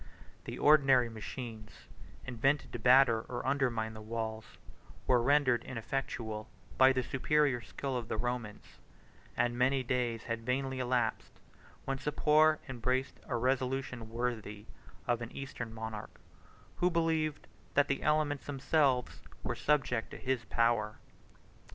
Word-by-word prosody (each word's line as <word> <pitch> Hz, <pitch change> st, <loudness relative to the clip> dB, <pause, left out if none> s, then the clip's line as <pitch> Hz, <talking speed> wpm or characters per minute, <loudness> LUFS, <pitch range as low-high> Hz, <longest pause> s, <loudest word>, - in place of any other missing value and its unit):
The -, -, -6 dB
ordinary 135 Hz, -5 st, +5 dB
machines, 110 Hz, -1 st, -8 dB, 0.4 s
invented 135 Hz, +4 st, 0 dB
to 120 Hz, -, -4 dB
batter 125 Hz, -1 st, +6 dB
or 120 Hz, -, -4 dB
undermine 125 Hz, -5 st, 0 dB
the 110 Hz, -, -9 dB
walls, 110 Hz, 0 st, -5 dB, 0.5 s
were 125 Hz, -2 st, +4 dB
rendered 130 Hz, -2 st, +3 dB
ineffectual 115 Hz, -3 st, -4 dB, 0.3 s
by 130 Hz, 0 st, +7 dB
the 130 Hz, -1 st, 0 dB
superior 135 Hz, 0 st, +1 dB
skill 135 Hz, +3 st, -5 dB
of 120 Hz, -3 st, -3 dB
the 110 Hz, -, -2 dB
Romans; 120 Hz, -2 st, -4 dB, 0.6 s
and 120 Hz, 0 st, +1 dB
many 130 Hz, +2 st, +2 dB
days 120 Hz, -2 st, -1 dB
had 115 Hz, 0 st, -4 dB
vainly 130 Hz, +2 st, -1 dB
elapsed, 125 Hz, -3 st, -1 dB, 0.5 s
when 135 Hz, 0 st, -2 dB
Sapor 150 Hz, +2 st, +4 dB
embraced 130 Hz, +1 st, -2 dB
a 125 Hz, -, -2 dB
resolution 125 Hz, -1 st, -1 dB
worthy 110 Hz, -3 st, -3 dB, 0.4 s
of 120 Hz, -1 st, 0 dB
an 115 Hz, -, -6 dB
eastern 135 Hz, -4 st, -6 dB
monarch, 110 Hz, -1 st, -7 dB, 0.6 s
who 180 Hz, -, +3 dB
believed 160 Hz, -3 st, 0 dB, 0.3 s
that 145 Hz, 0 st, +4 dB
the 140 Hz, -, -1 dB
elements 150 Hz, -2 st, +1 dB
themselves 135 Hz, -2 st, +1 dB, 0.2 s
were -, -, -1 dB
subject 135 Hz, -6 st, 0 dB
to -, -, -9 dB
his 130 Hz, -3 st, -2 dB
power. 115 Hz, -2 st, +1 dB
125 Hz, 130 wpm, -32 LUFS, 115-135 Hz, 0.6 s, by